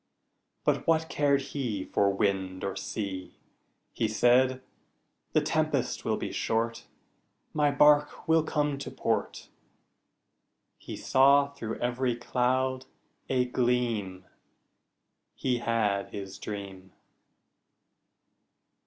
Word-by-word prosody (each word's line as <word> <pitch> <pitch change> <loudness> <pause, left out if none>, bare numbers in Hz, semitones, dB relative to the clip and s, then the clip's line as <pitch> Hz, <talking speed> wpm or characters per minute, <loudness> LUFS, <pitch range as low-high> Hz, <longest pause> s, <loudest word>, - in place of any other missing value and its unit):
But - - +1
what 160 0 +2
cared 140 -1 +2
he 115 -9 -2
For 100 - +2
wind 95 -2 -1
or 95 -1 -2
sea! 95 -2 -5 0.6
He 110 - 0
said, 130 +4 +3 0.7
"The - - +4
tempest - - 0
will - - +1
be - - -4
short, 115 +1 -1 0.7
My 150 -1 +3
bark 150 +2 +3
will 160 0 +5
come 150 -2 -1
to - - -5
port." - - -2 1.3
He - - -8
saw 140 +2 +4
through 115 -6 -5
every 125 0 0
cloud 130 +2 0 0.4
a 125 -1 +2
gleam 120 -7 -1 1.1
He 125 -2 0
had 105 -4 0
his 95 -1 -7
dream. 95 -2 -7
125 Hz, 100 wpm, -28 LUFS, 100-140 Hz, 1.3 s, will